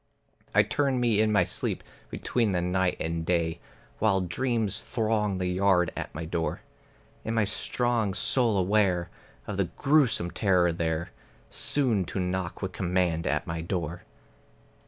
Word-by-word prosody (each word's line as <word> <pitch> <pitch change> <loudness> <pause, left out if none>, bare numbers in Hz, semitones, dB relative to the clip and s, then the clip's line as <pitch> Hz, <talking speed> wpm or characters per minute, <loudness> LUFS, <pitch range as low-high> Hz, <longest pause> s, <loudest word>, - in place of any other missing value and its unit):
I - - +7
turn 135 -3 0
me 115 -3 +2
in 110 0 +2
my 105 - +4
sleep - - -2 0.3
between 115 -5 -1
the 90 - +1
night 90 0 0
and 80 0 -2
day, 80 -1 0 0.4
While 100 -3 +2
dreams 110 +2 -1
throng 110 -4 -1
the 90 - -2
yard 90 -1 +2
at - - -6
my 80 +1 -4
door. 80 0 -2 0.6
In 110 - -2
my 110 - +3
strong 110 0 0
soul 115 -4 +3
aware 90 -2 +1 0.3
of 100 -2 -5
a 100 - +3
grewsome 125 - +2
terror 90 -4 +2
there 80 0 -2 0.4
Soon 120 -10 +2
to 95 - -4
knock 90 0 -3
with 95 - -2
command 90 -2 0
at - - 0
my 80 0 -4
door. 85 -1 -3
95 Hz, 150 wpm, -27 LUFS, 85-110 Hz, 0.6 s, I